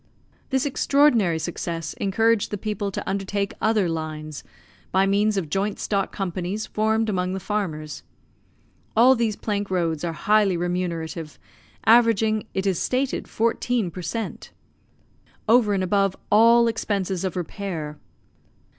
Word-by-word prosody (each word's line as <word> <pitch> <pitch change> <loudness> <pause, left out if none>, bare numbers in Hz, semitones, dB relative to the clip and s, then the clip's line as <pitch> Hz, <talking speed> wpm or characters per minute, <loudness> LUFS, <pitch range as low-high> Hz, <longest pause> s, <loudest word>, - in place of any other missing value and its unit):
This 265 0 +1
extraordinary 265 - +3
success 165 0 -4
encouraged 225 +2 +1
the 205 - -3
people 205 -1 -3
to 195 - -5
undertake 200 0 -2
other 215 -4 +2
lines, 155 -2 -5 0.5
by 190 +1 +3
means 205 +1 +2
of 180 -5 -1
joint 195 +6 -1
stock 200 -2 -1
companies 190 +2 -3
formed 220 +1 0
among 185 -3 -1
the 190 - -3
farmers. 170 -8 -3 1.0
All 250 +3 +7
these 230 -4 0
plank 205 -2 -3
roads 170 -4 -1
are 170 -1 -2
highly 205 +1 +2
remunerative, 170 -3 -3 0.5
averaging, 220 -1 +4
it 190 - -1
is 190 -4 +1
stated, 260 +1 -1
fourteen 230 -3 0
per 180 - -7
cent. 225 +6 -5 1.0
over 225 -1 +5
and 195 -2 +1
above 195 0 +1 0.2
all 230 +2 +6
expenses 200 -5 -1
of 190 -3 -2
repair. 170 -4 -5
200 Hz, 130 wpm, -24 LUFS, 175-220 Hz, 1.0 s, All